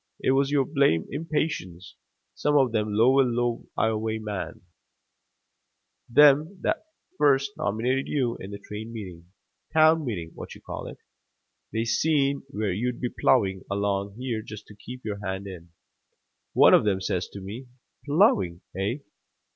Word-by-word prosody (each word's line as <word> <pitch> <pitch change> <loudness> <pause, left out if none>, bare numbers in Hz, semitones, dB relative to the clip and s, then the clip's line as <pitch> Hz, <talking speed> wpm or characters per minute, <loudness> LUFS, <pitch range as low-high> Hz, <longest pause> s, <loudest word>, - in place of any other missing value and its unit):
It - - +1
was 135 +1 +2
your 140 -2 +2
blamed 140 - +2
impatience. 140 - -3 0.4
Some 150 0 +1
of 130 -4 +3
them 105 -2 -1
lower 125 +6 +5 0.5
Ioway 110 0 0
men, 105 -3 -5 1.5
them 150 +7 +5
that - - -1 0.3
first 140 -1 +3
nominated 125 +6 -1
you 125 -5 0
in 95 - -8
the 100 - -6
train 110 +2 -8
meeting 90 -6 -9 0.4
town 160 0 +5
meeting 90 - -4
what - - -9
you - - -15
call - - -7
it, - - -9 0.7
they 110 +1 -1
seen 140 +2 +1
where 105 -8 -2
you'd 120 +5 -2
been 125 - -3
plowing 95 -7 +3
along 100 0 -1
here 120 -3 -3
just 105 -1 -10
to 105 - -12
keep 125 +4 -10
your 105 -1 -4
hand 95 0 -4
in. 90 -3 -9 0.8
One - - +7
of - - +6
them 100 -3 +1
says 90 -2 -2
to 100 - -7
me, 105 +7 -8 0.4
'Plowing, 105 - +2
hey? 105 +10 -2
110 Hz, 145 wpm, -26 LUFS, 100-140 Hz, 1.5 s, One